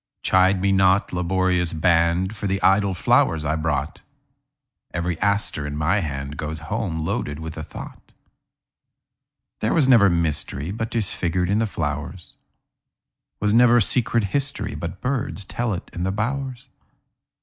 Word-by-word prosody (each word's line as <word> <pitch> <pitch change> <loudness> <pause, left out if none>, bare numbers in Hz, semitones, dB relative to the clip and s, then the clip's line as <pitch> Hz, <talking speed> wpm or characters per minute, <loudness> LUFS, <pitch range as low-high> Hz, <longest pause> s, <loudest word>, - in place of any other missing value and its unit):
Chide 95 +1 +4
me 100 +1 +1
not, 95 0 +3
laborious 90 -1 0
band, 85 +4 +2
For 100 0 -4
the 95 0 0
idle 95 0 +3
flowers 80 -2 +2
I 80 +1 0
brought; 75 -2 -2 0.9
Every 85 -1 -2
aster 100 -7 +1
in 75 0 -5
my 85 +7 +1
handGoes 75 +1 -4
home 80 -1 -3
loaded 75 -5 -2
with 80 0 -7
a 75 - -5
thought. - - -10 1.5
There 110 - 0
was 150 -6 +4
never 115 -7 +6
mysteryBut 85 +5 -2
'tis 110 -5 -1
figured 90 +1 -1
in 105 - +2
the 110 - +1
flowers; 75 +1 -5 1.1
SWas 105 0 +1
never 120 +1 +6
secret 115 +1 +2
historyBut 100 - -3
birds 125 -6 -2
tell 120 +4 -2
it 90 - -8
in 85 - -6
the 95 +2 0
bowers. 125 +4 -3
95 Hz, 140 wpm, -22 LUFS, 80-105 Hz, 1.5 s, never